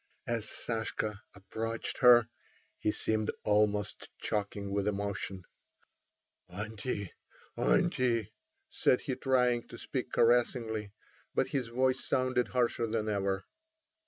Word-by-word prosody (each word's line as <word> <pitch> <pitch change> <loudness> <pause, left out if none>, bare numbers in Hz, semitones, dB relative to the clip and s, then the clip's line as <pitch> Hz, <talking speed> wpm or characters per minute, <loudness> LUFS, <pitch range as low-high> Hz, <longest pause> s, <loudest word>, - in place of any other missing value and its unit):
As 115 -2 -1
Sashka 110 -2 -2 0.2
approached 110 +3 -4
her 120 -3 +8 0.5
he 105 - +1
seemed 110 0 -1
almost 105 -1 +1
choking 100 -1 -2
with 100 0 0
emotion. 100 -2 -2 1.1
"Auntie—auntie!" 105 - -1 0.4
said 125 - +3
he, 135 - -2
trying 125 -3 +2
to - - -10
speak - - -4
caressingly, 115 -3 +2 0.4
but - - +2
his 130 -4 -1
voice 130 +2 +1
sounded 130 -1 +1
harsher 120 -2 +1
than 110 -1 -1
ever. 100 -1 -1
110 Hz, 100 wpm, -32 LUFS, 100-120 Hz, 1.1 s, her